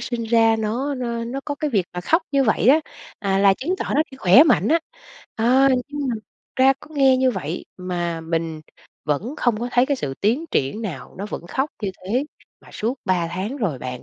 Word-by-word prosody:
sinh 240 -2 -3
ra 225 0 +4
nó 240 +7 -1
nó 235 -2 -3
nó 255 +4 -4
có 290 - -3
cái 300 +1 -2
việc 200 -7 +1
mà 180 - -4
khóc 325 - +2
như 275 -1 +3
vậy 220 0 +2
á, 300 +4 +6 0.4
à, 195 -3 0
là 195 0 +5
chứng 330 - -2
tỏ - - -3
nó 300 - +4
đi 265 - -12
khỏe 220 +2 +7
mạnh 320 - +3
á. 330 - +4 0.6
Ờ. 255 +4 +4 0.2
nhưng 290 -1 -3
mà 245 - 0
thực 215 -1 -9 0.3
ra 265 +1 +6
có - - -14
nghe 270 -2 +5
như 260 0 +3
vậy 180 -6 -4
mà 175 -2 -3
mình 160 -1 -3 0.4
vẫn 170 - -2
không 230 -3 0
có 240 - -2
thấy 245 +1 +4
cái 285 - 0
sự 135 - -4
tiến 235 +10 +1
triển 140 +12 -1
nào, 155 - -6
nó 200 - -4
vẫn 170 - -7
khóc 270 - -1
như 200 - -1 0.2
thế 245 +8 0 0.4
mà - - -18
suốt 230 +4 -2
3 180 -4 +1
tháng 190 +9 -4
rồi 190 - -2
bạn, 125 0 -6
225 Hz, 225 wpm, -22 LUFS, 185-265 Hz, 0.6 s, khỏe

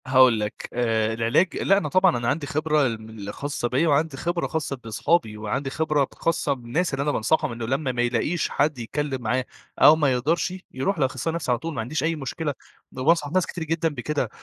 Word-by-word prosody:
هاقول 130 -3 +5
لَك، 105 0 -4
آآ 115 -2 +1
العلاج 115 +11 +2
لأ، 195 - +3
أنا 200 - -1
طبعًا 185 -5 +4
أنا 120 0 -2
عندي 145 +2 -1
خبرة 155 0 +1
ال 115 -3 -2
من 110 - -11
ال 100 +1 -6
خاصّة 140 -3 -3
بيا 135 +7 +1
وعندي 150 -1 +1
خبرة 170 +4 -1
خاصّة 155 -3 -2
بِصحَابي، 115 +1 0
وعندي 110 +6 -2
خبرة 155 0 +1
ب - - -6
خاصّة 165 -3 0
بالناس 135 +7 -2
اللي 135 +1 0
أنا 150 - +1
بانصحهم 155 +4 +1
إنه 115 -1 -5
لمّا 135 +3 -1
ما 120 -1 -1
يلاقيش 120 +8 0
حد 145 -2 0
يتكلم 135 +3 -3
معاه 125 +3 0 0.3
أو 155 - +8
ما 150 -4 +2
يقدرشِ، 155 +8 0 0.2
يروح 150 +8 -1
لأخصائي 135 +4 0
النفسي 165 -6 -2
على 120 - +1
طول، 165 0 -5
ما 120 - -2
عنديش 140 +8 -3
أي 165 +1 +1
مشكلة، 150 +1 -3 0.4
ده 130 - -7
أنا 130 - -3
بانصح 160 -3 +3
ناس 185 0 +2
كتير 170 - -5
جدًا 165 +1 0
بكده. 145 -4 -2
140 Hz, 220 wpm, -24 LUFS, 120-160 Hz, 0.4 s, أو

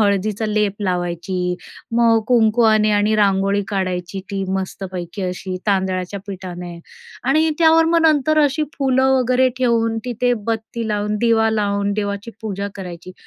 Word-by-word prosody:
हळदीचा 205 +1 +1
लेप 210 -2 0
लावायची. 180 0 -2 0.4
मग 230 -1 +4
कुंकुवाने 220 -2 +4
आणि 210 +1 +2
रांगोळी 200 0 +2
काढायची 185 -1 -3
ती 195 -1 -2
मस्तपैकी 190 -1 -5
अशी 185 0 -4
तांदळाच्या 190 -1 -1
पिठाने. 180 -3 -7 0.5
आणि 310 +5 +3
त्यावर 325 0 +5
मग 335 +1 +3
नंतर 310 0 +3
अशी 290 +2 0 0.2
फुलं 265 -1 +2
वगैरे 255 +1 +3
ठेवून 230 -2 +1
तिथे 245 0 0
बत्ती 225 0 -3
लावून 210 0 -1
दिवा 225 -1 +3
लावून 200 -2 0
देवाची 205 +1 -3
पूजा 200 -1 -3
करायची. 180 -1 -8
205 Hz, 130 wpm, -20 LUFS, 190-230 Hz, 0.5 s, त्यावर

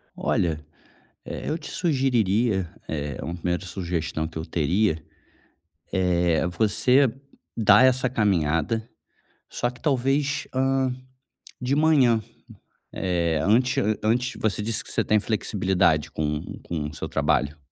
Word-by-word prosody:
Olha, 80 -3 0 0.7
eh, - - -6
eu 155 - -1
te - - -9
sugeriria, 115 - +1 0.2
eh, 75 -4 -4
uma 85 - -4
1ª 90 +2 -2
sugestão 85 -4 -3
que 80 0 -7
eu 80 - -4
teria, 85 +1 0 0.9
eh, 90 -2 +2
você 110 +9 +3 0.5
dar 105 +2 +6
essa 130 0 +3
caminhada, 100 - 0 0.6
só 120 - -1
que 125 - -14
talvez, 140 0 0
hã, 130 0 +1 0.7
de 125 +2 0
manhã, 140 -7 +4 0.7
eh, 85 -3 0
antes 125 +6 +3
a-antes 110 +4 0
você 105 -1 0
disse 110 +1 -1
que - - -10
você - - +1
tem 110 - +3
flexibilidade 95 -7 +1
com 75 0 -2 0.2
com 80 -3 -3
o 75 - -12
seu - - -6
trabalho. 75 +2 0
105 Hz, 125 wpm, -25 LUFS, 85-125 Hz, 0.9 s, dar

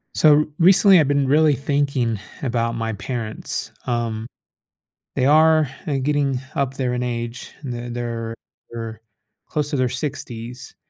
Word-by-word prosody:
So, 155 - +6
r 150 - +1
recently, 190 +1 +7
I've 150 - +3
been 140 -1 +2
really 150 +2 +5
thinking 140 -5 0 0.2
about 115 -3 0
my 115 -1 -2
parents. 110 +1 -4
Um. 115 -2 -2 0.9
They 130 - +2
are, 155 0 +5 0.2
uh, 145 -3 0
getting 140 -2 +1 0.2
up 135 -2 0
there 125 -2 -1
in 125 - -1
age. 120 0 -4
And 135 -4 -5
then 120 0 -5
they're 115 -1 -4 0.4
they're 115 -1 -6 0.5
close 150 -2 -1
to - - -2
their 130 -1 +2
60s, 125 -3 -6
125 Hz, 150 wpm, -22 LUFS, 115-145 Hz, 0.9 s, recently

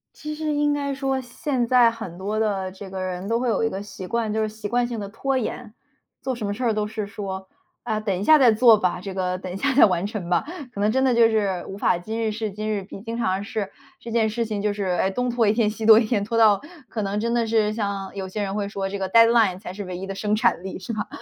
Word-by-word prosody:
其 305 0 -6
实 305 0 -2
应 295 0 +2
该 280 -1 -2
说 270 -1 -1
现 250 0 -2
在 245 -2 +5
很 220 -7 -8
多 205 +3 -2
的 195 -4 -1
这 195 +1 -10
个 190 0 -5
人 185 +1 -4
都 230 +1 +1
会 250 - -1
有 225 - +1
一 225 - +2
个 195 0 -5
习 195 -2 -8
惯， 230 +1 -1
就 220 - 0
是 215 - 0
习 215 0 -6
惯 240 +3 +1
性 235 -2 -4
地 200 - -5
拖 265 +5 -1
延。 240 -2 -4 0.5
做 260 - -2
什 230 -3 -4
么 200 - -1
事 240 +5 -5
儿 230 - +2
都 210 0 0
是 215 -1 -4
说： 190 -2 -6 0.4
“啊， 220 -3 -1
等 200 -4 -1
一 - - -3
下 310 +7 +7
再 255 -5 +6
做 225 0 +6
吧， 180 -3 0
这 195 0 -6
个 185 -1 -1
等 185 0 -7
一 - - -5
下 270 +7 0
再 275 - +8
完 180 -2 0
成 205 -5 -5
吧”。 175 -1 +2 0.3
可 200 - -4
能 210 +1 +3
真 265 +3 +1
的 255 -2 +3
就 230 -1 +6
是 200 -5 0
无 195 - -7
法 190 - +2
今 220 +6 -4
日 220 -1 0
事 215 0 -3
今 215 +2 -4
日 205 -2 -1
毕。 195 - -10
经 230 +2 -5
常 190 -4 0
是 205 -1 -4 0.3
这 235 - -8
件 225 -1 +2
事 230 +2 -1
情， 210 -2 -3
就 210 0 0
是， 205 0 -3
哎， 185 +1 +1
东 250 +6 -1
拖 235 -2 +2
一 205 - +4
天 220 -2 +2
西 220 +1 -5
拖 220 -1 +9
一 225 - +4
天， 215 -2 0
拖 230 +2 -2
到 215 -3 +6 0.3
可 220 - -3
能 200 +1 -2
真 235 +1 0
的 235 -1 +1
是 220 -1 +2
像 200 -3 -3
有 190 -1 -4
些 210 +3 -4
人 195 -1 -2
会 205 -1 -2
说； 200 -1 -3
“这 200 - -4
个 190 -1 -2
deadline 230 -3 +5
才 180 - -7
是 200 +2 -6
唯 180 -1 -5
一 190 - -5
的 195 - -5
生 210 +1 0
产 215 - +2
力”， 190 - -5
是 190 - -6
吧？ 215 -2 -3
215 Hz, 330 characters per minute, -23 LUFS, 195-230 Hz, 0.5 s, 拖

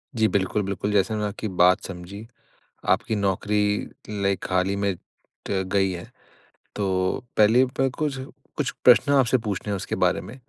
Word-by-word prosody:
जी, 110 -1 +3
बिल्कुल, 100 +1 0
बिल्कुल। 100 +1 -2
जैसे 105 +2 +2
मैंने 105 -1 -1
आपकी 105 +2 -5
बात 90 0 +4
समझी। 95 +4 -8 0.6
आपकी 110 - +2
नौकरी 105 +1 0 0.3
लाइक 100 0 0
हाल 90 0 +2
ही 100 - -1
में 100 -1 0 0.5
त 95 -1 0
गई 95 -1 +2
है। 85 - -8 0.7
तो 95 +1 -1
पहले 110 +5 +5
प 135 +1 0
कुछ, 145 -3 -1 0.4
कुछ 135 -4 -1
प्रश्न 125 +3 +6
आपसे 130 -2 +4
पूछने 105 -2 -4
हैं 100 - 0
उसके - - -4
बारे - - +2
में। 115 - -10
105 Hz, 165 wpm, -24 LUFS, 95-110 Hz, 0.7 s, प्रश्न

